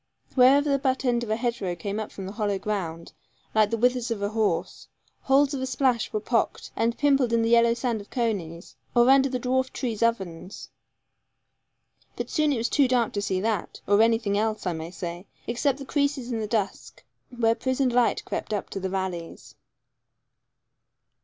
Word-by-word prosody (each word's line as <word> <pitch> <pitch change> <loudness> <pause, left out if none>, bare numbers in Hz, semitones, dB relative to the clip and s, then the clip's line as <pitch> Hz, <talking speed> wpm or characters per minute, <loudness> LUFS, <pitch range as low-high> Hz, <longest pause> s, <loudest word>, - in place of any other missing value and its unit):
Wherever 270 +3 +5
the 280 -1 +2
butt 265 0 0
end 240 -1 +1
of 230 - -6
a 215 - +2
hedgerow 230 -6 -2
came 200 +5 -4
up 215 - -5
from 195 - -7
the 190 - -5
hollow 205 -2 -1
ground, 175 -5 -4 0.4
like 215 -1 +4
the 230 - -1
withers 250 +1 +1
of 215 -3 -3
a 200 - 0
horse, 210 -6 -1 0.3
holes 275 +2 +3
of 260 -1 -2
splash 255 -4 +1
were 215 - -1
pocked 230 +2 -1
and 230 +1 0
pimpled 275 -4 +3
in 230 -1 +2
the 225 - +1
yellow 235 0 +5
sand 235 -3 -2
of 200 - -15
coneys, 190 -9 -3 0.2
or 240 +2 +6
under 270 0 +5
the 255 -1 -2
dwarf 260 +1 0
tree's 235 -5 -4
ovens. 190 -6 -2 1.5
But - - -5
soon 305 -2 +2
it 270 - 0
was 230 +2 0
too 280 -3 +3
dark 245 -3 +1
to 205 - -1
see 190 -2 -1
that, 215 -3 -2
or 205 +1 +4
anything 225 -3 +2
else, 215 -1 -1
I 180 - 0
may 160 0 -6
say, 175 +1 -7 0.2
except 255 +3 0
the 275 - -8
creases 280 -3 -1
in 230 - -1
the 215 - -3
dusk, 205 -3 -3 0.3
where 230 -2 +2
prisoned 260 +1 0
light 245 -1 +2
crept - - -4
up 200 - -5
the 190 -1 -3
valleys. 185 -3 -5
230 Hz, 185 wpm, -26 LUFS, 200-255 Hz, 1.5 s, or